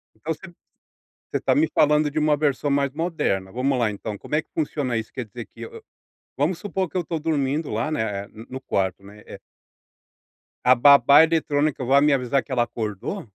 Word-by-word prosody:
Então 155 +9 -4
você 185 +3 -12 0.8
você - - 0
está - - +1
me 315 +2 +3
falando 150 0 +3
de 150 - -8
uma 150 -1 +2
versão 145 -1 0
mais 140 -1 +1
moderna. 150 - -2
Vamos 130 +2 0
lá 115 -3 +1
então. 105 +1 -6
Como 150 - -4
é 155 - +2
que - - -33
funciona 140 -6 -2
isso? 110 - -5
Quer 125 - -5
dizer 120 +1 -9
que 115 - -16
eu 115 - -8
eu, - - -11 0.5
vamos 165 +5 0
supor 190 -2 -2
que - - -24
eu 180 - +2
estou 165 0 -4
dormindo 150 -1 -1
lá, 155 - -2
né, 105 -7 -2
no 110 +1 -13
no 130 +1 -7
quarto, 95 -3 -2
né, 105 +2 -14
eh - - -11 1.2
a 125 +1 +6
babá 140 +3 +7
eletrônica 150 -4 0
vai 140 +2 +4
me 150 -1 +4
avisar 130 0 0
que 140 - -15
ela 120 -2 +2
acordou? 115 - -5
140 Hz, 205 wpm, -23 LUFS, 115-155 Hz, 1.2 s, babá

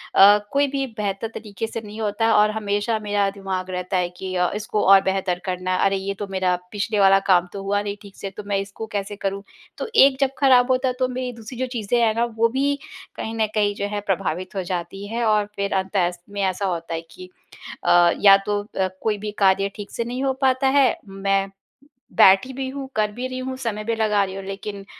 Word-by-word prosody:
अ, 205 +2 +8
कोई 280 0 +2
भी 275 0 -2
बेहतर 205 +1 -2
तरीके 215 0 -5
से 225 0 -5
नहीं 215 +1 -8
होता 220 +2 +1
और 210 0 +5
हमेशा 210 +1 -1
मेरा 205 -1 0
दिमाग 190 -2 -4
रहता 180 +1 -2
है 180 -1 0
कि 185 +1 -7
अ, 180 0 +1
इसको 210 0 -2
और 195 0 +8
बेहतर 190 -2 -1
करना 185 0 -2
है - - 0
अरे 195 0 +2
ये 195 +1 -3
तो 205 - -4
मेरा 185 -2 0 0.2
पिछले 210 0 -1
वाला 195 0 +6
काम 180 -1 +5
तो 200 - -5
हुआ 205 +1 0
नहीं 205 0 -4
ठीक 200 -2 -14
से 195 - -5
तो 210 - -6
मैं 200 -1 0
इसको 200 +3 -6
कैसे 205 0 -3
करूँ। 195 0 -3 0.3
तो - - -4
एक 270 -1 +6
जब 270 - +4
खराब 260 -2 +5
होता 255 +1 +2
है 250 - 0
तो 255 - +2
मेरी 250 0 -4
दूसरी 230 +2 -10
जो 260 - -1
चीज़ें 235 0 0
हैं 220 -1 +3
ना 235 - +1
वो 230 - +4
भी 275 +3 0 0.4
कहीं 225 - -5
न 220 -1 +1
कहीं 205 -1 +2
जो 200 - -3
है 205 0 -3
प्रभावित 185 +1 -2
हो 190 - -1
जाती 185 +3 -5
हैं 235 +2 -2
और 210 -1 +3
फिर 200 0 -2
अंत:स्त 190 -2 0
में 200 0 -4
ऐसा 190 +1 0
होता 170 -2 -3
है 165 - -3
कि 185 0 -11 0.6
अ, 175 0 +5
या 195 -1 +8
तो 205 0 0
अ, 190 -2 -2
कोई 210 -2 0
भी 210 +1 -4
कार्य 195 0 +3
ठीक 205 -1 -8
से 235 - -3
नहीं 250 +2 -4
हो 265 - +2
पाता 265 0 +3
है। 270 -1 +5 0.2
मैं 195 0 0 0.7
बैठी 195 +7 +6
भी 265 0 -4
हूँ, 270 0 -6
कर 210 -1 +1
भी 250 +4 -4
रही 255 0 -5
हूँ, 260 0 -4
समय 215 -4 -3
भी 230 +1 -1
लगा 210 -2 +2
रही 190 0 -5
हूँ 195 - -6
लेकिन 195 0 -6
205 Hz, 235 wpm, -22 LUFS, 195-225 Hz, 0.7 s, अ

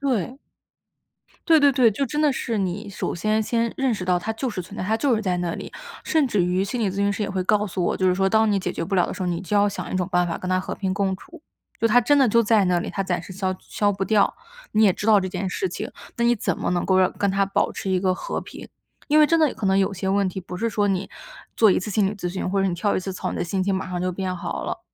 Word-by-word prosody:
对。 260 -2 -1 1.1
对 320 -2 +6
对 285 0 +6
对， 250 -3 +4
就 275 +8 -1
真 295 +2 -2
的 295 -3 +3
是 230 -4 -2
你 195 +2 -3
首 195 - -3
先 215 +5 0
先 230 +1 0
认 265 -4 +1
识 185 - -5
到 180 -1 +2
它 220 +5 -3
就 250 +3 -3
是 190 - -4
存 190 +4 -10
在， - - -3
它 220 +4 0
就 270 0 +2
是 220 - -1
在 180 -3 0
那 175 -1 -2
里。 - - -8 0.3
甚 315 -3 +2
至 210 -7 +1
于 180 +2 +1
心 235 +5 -3
理 210 -4 +1
咨 190 - -7
询 200 0 +1
师 210 - -3
也 200 - -2
会 190 -1 -2
告 210 +1 +2
诉 185 -3 -2
我， - - 0
就 185 -1 +2
是 180 - +2
说 195 0 +2
当 220 +2 +3
你 200 - +2
解 190 - -3
决 165 - -3
不 195 - -2
了 180 - +3
的 - - -5
时 - - -5
候， - - -1
你 170 -1 -2
就 195 +2 -1
要 205 0 +4
想 200 - -6
一 - - -2
种 185 +1 -1
办 180 -1 +2
法 165 - -3
跟 185 - -6
它 185 - +2
和 185 - -4
平 190 -2 -2
共 195 -1 0
处， 340 - -15 0.4
就 230 - +3
它 240 +2 +5
真 285 +5 +3
的 265 -3 +5
就 230 +2 +4
在 215 -2 +3
那 180 -1 +2
里， - - -4
它 200 - -4
暂 180 -2 -2
时 185 - -10
消 185 0 -2
消 205 -1 0
不 195 0 -2
掉， 205 -1 +2 0.4
你 215 +1 +3
也 200 - +6
知 205 - -5
道 210 -3 +6
这 185 - -3
件 190 +1 -3
事 380 - -2
情， - - -5 0.3
那 235 - 0
你 240 0 +4
怎 205 - -2
么 - - -1
能 175 -1 0
够 190 -1 +3
让 185 - +3
跟 200 - 0
它 195 0 +1
保 195 - 0
持 - - -6
一 185 -1 +1
个 185 -1 +2
和 - - -4
平。 - - -11 0.4
因 305 +1 +5
为 300 - +7
真 330 +2 +3
的 310 -4 +2
可 215 -2 -3
能 190 0 +3
有 195 0 +1
些 190 +1 -3
问 195 0 +2
题 185 +1 -5
不 180 0 -8
是 230 +5 -1
说 205 -1 0
你 195 -1 -1 0.5
做 220 -3 +5
一 - - +3
次 205 +3 -5
心 200 -1 +2
理 - - -3
咨 180 -3 -3
询， 185 +1 -3
或 195 0 +1
者 195 - +2
你 180 - -1
跳 200 +4 0
一 - - +1
次 190 +1 -5
操， - - -4
你 - - -4
的 - - -1
心 190 +2 -1
情 195 +1 0
马 190 0 -2
上 180 -1 -3
就 185 - 0
变 185 0 -3
好 - - -4
了， - - -4
195 Hz, 340 characters per minute, -23 LUFS, 185-220 Hz, 1.1 s, 为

